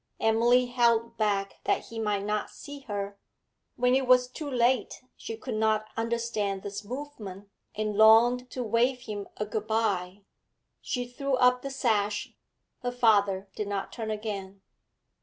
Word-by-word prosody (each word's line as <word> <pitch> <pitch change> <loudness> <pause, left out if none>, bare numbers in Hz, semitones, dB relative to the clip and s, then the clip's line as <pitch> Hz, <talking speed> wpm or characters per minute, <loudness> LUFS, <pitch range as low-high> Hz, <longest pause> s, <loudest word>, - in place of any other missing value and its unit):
Emily 235 +3 +4
held 235 -2 +2
back 200 -2 0
that - - 0
he 230 - -6
might 210 -2 0
not 210 0 -1
see 285 -1 -10
her; 200 -1 -4 0.6
when 250 +1 +2
it 265 0 +2
was 250 0 +5
too 290 +4 -6
late 250 -1 +1
she 225 - -7
could 245 +1 -5
not 215 0 +1
understand 225 -4 -1
this 205 +1 -5
movement, 210 -6 -7 0.3
and 215 -1 -2
longed 235 +4 +6
to 250 - -4
wave 240 +3 +1
him 205 -4 -6
a 210 - -2
good 215 0 -4
bye. 200 -4 -1 0.6
She 245 -2 -3
threw 270 +2 -1
up 250 0 +4
the 275 - -5
sash; 215 -6 0 0.5
her 245 -1 -2
father 205 -5 +3
did 210 - -3
not 200 -1 -3
turn 225 -2 -4
again. 200 -3 -5
220 Hz, 155 wpm, -28 LUFS, 205-245 Hz, 0.6 s, longed